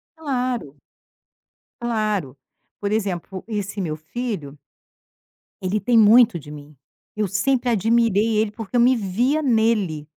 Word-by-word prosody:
Claro. 255 - -3 1.1
Claro, 215 - -2 0.4
por 200 0 -2
exemplo 195 -3 -3
esse 205 -2 -4
meu 160 -4 -2
filho 160 - -5 1.0
ele 190 +3 -1
tem 240 +2 +2
muito 225 -1 +6
de 145 0 -12
mim, 150 0 -11 0.4
eu 210 -1 0
sempre 245 +6 0
admirei 225 0 +2
ele 215 -1 +1
porque 225 +1 -8
eu - - +4
me 255 +2 +5
via 240 +8 0
nele. 220 - +1
215 Hz, 125 wpm, -22 LUFS, 185-240 Hz, 1.1 s, muito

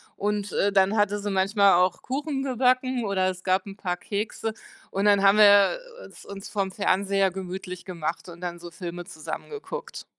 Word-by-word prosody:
und, 205 -1 -2
äh, 200 - +2
dann 195 +2 +3
hatte 205 0 +2
sie 205 0 -3
manchmal 195 +1 +4
auch 180 +1 +2
Kuchen 280 +1 -3
gebacken 255 -1 +1
oder 190 -2 +1
es 185 0 -6
gab 185 +1 +1
'n 195 - -8
paar 180 -3 -3
Kekse 215 +2 -3 0.4
und 195 +1 -1
dann 205 -1 +5
haben 200 +1 +6
wir, 205 - +7 0.3
äh, - - -10
es - - -15
uns 200 0 -8
vorm 195 -2 -2
Fernseher 195 +1 +1
gemütlich 185 0 -7
gemacht 170 -1 -4
und 170 0 -11
dann 175 -1 -5
so 175 - -9
Filme 175 0 -6
zusammen 160 -4 -7
geguckt. 470 +2 -7
195 Hz, 190 wpm, -25 LUFS, 185-210 Hz, 0.4 s, wir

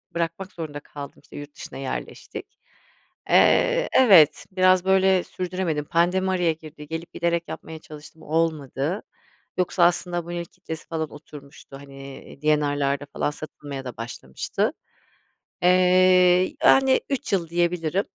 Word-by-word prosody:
bırakmak 170 +4 -3
zorunda 155 -3 -6
kaldım. 145 -1 -10
İşte, - - -15
yurt 145 0 -9
dışına - - -9
yerleştik. 135 -1 -7 0.7
Eee, - - +4
evet, 175 - +6
biraz 185 0 +4
böyle 190 -1 +4
sürdüremedim. 180 -5 -3
Pandemi 180 +3 +1
araya 175 -3 +1
girdi. 155 -1 -12
Gelip 165 +2 -6
giderek 170 0 -1
yapmaya 160 0 -8
çalıştım, 155 -1 -13
olmadı. 155 +1 -1 0.5
Yoksa 180 0 +1
aslında 175 0 +1
bunun 175 0 -6
ilk 170 -1 -5
kitlesi 160 -4 -8
falan 160 -2 -3
oturmuştu. 145 -1 -12
Hani, 135 -1 -11 0.2
D&R'larda 145 -2 +1
falan 145 - -1
satılmaya 145 -3 -8
da 125 - -7
başlamıştı. 115 +1 -3 0.9
Eee, 180 0 +5
yani 265 -1 +5
3 270 -6 -3
yıl 170 -4 +1
diyebilirim. 175 +1 0
165 Hz, 125 wpm, -24 LUFS, 150-185 Hz, 0.9 s, evet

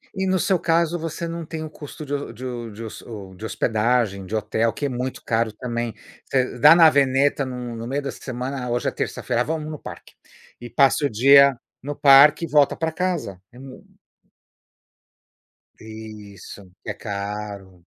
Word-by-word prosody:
E 190 0 -1
no 185 0 +2
seu 190 -4 +1
caso, 170 0 +1
você 165 +1 -4
não 165 0 -5
tem 160 0 -6
o 155 - -6
custo 150 0 -10
de 145 - -5
ho 140 -4 -3
de 120 -1 -6
de 110 +3 -9
hos 110 - -8
ou, 100 -5 -10
de 110 +4 -9
hospedagem, 110 -3 0
de 110 - -4
hotel, 110 +2 0
que 145 - -4
é - - 0
muito 125 +1 -4
caro 115 -1 0
também. 120 0 -4 0.3
Você 130 -2 -1
dá 150 +5 +8
na 165 -2 +8
veneta 140 0 +2
no 125 -2 -6
no 115 +1 -6
meio 140 +3 -2
da 140 - -3
semana, 130 +1 -5
ah, - - -4
hoje 120 +1 -1
é - - +1
terça-feira, 120 - -2
vamos 155 0 -4
no 150 - -7
parque - - -11 0.5
e 120 - -8
passa 140 +1 +3
o - - -7
dia 140 +3 +6 0.2
no 145 +2 -5
parque 145 +3 +6
e - - -7
volta 145 -1 +3
pra 160 0 -1
casa, 160 - -3
é 120 - -17
mu 135 0 -12 2.0
Isso, 105 -3 -11
que - - -7
é - - -5
caro. 100 -3 -7
125 Hz, 185 wpm, -22 LUFS, 110-145 Hz, 2.0 s, dá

